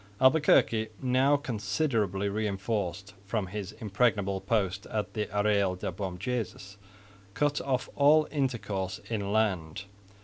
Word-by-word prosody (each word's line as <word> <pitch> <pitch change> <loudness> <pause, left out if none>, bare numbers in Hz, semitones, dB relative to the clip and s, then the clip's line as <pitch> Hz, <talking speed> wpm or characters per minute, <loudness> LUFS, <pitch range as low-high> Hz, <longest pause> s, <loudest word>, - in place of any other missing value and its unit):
Albuquerque, 130 -5 +4
now 130 +2 +3
considerably 105 - -1
reinforced 100 -2 -2
from 105 -1 -1
his 100 +1 -6
impregnable 105 -3 0
post 100 -4 -1
at 105 -3 -3
the 105 -2 -2
Arreyal 100 -2 +1
de 90 - -4
Bom 95 0 -5
Jesus, 105 -2 -4 0.6
cut 145 -1 +1
off 130 -2 -1
all 150 +2 +5
intercourse 115 -9 -2
inland. 100 -6 0
105 Hz, 110 wpm, -29 LUFS, 100-125 Hz, 0.6 s, all